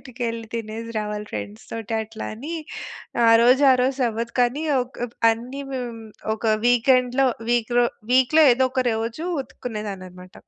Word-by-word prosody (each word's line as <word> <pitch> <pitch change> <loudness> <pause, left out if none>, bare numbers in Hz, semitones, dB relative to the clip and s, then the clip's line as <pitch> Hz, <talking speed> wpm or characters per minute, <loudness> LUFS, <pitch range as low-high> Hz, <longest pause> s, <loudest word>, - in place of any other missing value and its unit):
బయటికెళ్ళి 230 -3 -5
తినేసి 225 0 -5
రావాలి 210 0 -4
ఫ్రెండ్స్‌తోటి. 110 - -6
అట్లా 220 0 -7
అని 290 +10 -6 0.7
ఆ - - +7
రోజు 255 +4 +5
ఆ - - +5
రోజు 265 +1 0
అవ్వదు. 230 +1 -4
కానీ 245 +5 +1 0.2
ఒక్ 250 +1 -7 0.3
అన్నీ 245 +5 -4
హ్మ్, 240 -3 -5 0.3
ఒక 220 - -12 0.2
వీకెండ్‌లో 250 +2 +3 0.2
వీక్‌లో 240 0 +2 0.3
వీక్‌లో 260 +5 +5
ఏదో 260 +1 +2
ఒక 260 -1 0
రోజు 230 +9 -3 0.2
ఉతుక్కునేదాన్ని 210 -6 -6
అనమాట. 180 +1 -14
235 Hz, 135 wpm, -23 LUFS, 220-255 Hz, 0.7 s, ఆ